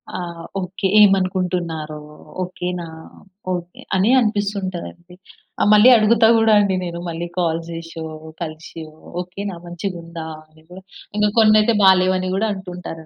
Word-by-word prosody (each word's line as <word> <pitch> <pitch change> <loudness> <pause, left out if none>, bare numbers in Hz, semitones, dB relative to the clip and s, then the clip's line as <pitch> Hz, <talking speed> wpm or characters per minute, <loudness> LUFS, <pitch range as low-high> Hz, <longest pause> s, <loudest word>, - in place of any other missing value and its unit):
ఆ! - - -3 0.4
ఓకే. 190 +1 -3
ఏమనుకుంటున్నారో? 180 -6 +1 0.5
ఓకే 180 0 -6
నా? 170 - -6 0.7
ఓకే, 175 0 -6 0.2
అని 190 +4 +2
అనిపిస్తుంటదండి. 200 -5 -3 0.5
ఆ - - +4
మళ్ళీ 210 +4 +7
అడుగుతా 225 +1 +4
గూడా 225 -1 +4
అండి 200 -2 +2
నేను 170 -1 -5
మళ్ళి 170 +1 -4
కాల్ 165 -2 +1
జేసో, 165 0 -7 0.4
కలిసో 160 0 -7 0.4
ఓకేనా 190 +2 -6
మంచిగుందా? 170 -2 -6 0.2
అని 155 0 -23
కూడా. 185 +2 -11 0.4
ఇంక 210 0 +3
కొన్నయితే 215 0 +5
బాలేవు 185 -1 +5
అని 185 0 -3
గూడా 220 +3 0
అంటుంటారు 180 -4 -8
185 Hz, 130 wpm, -20 LUFS, 170-200 Hz, 0.7 s, మళ్ళీ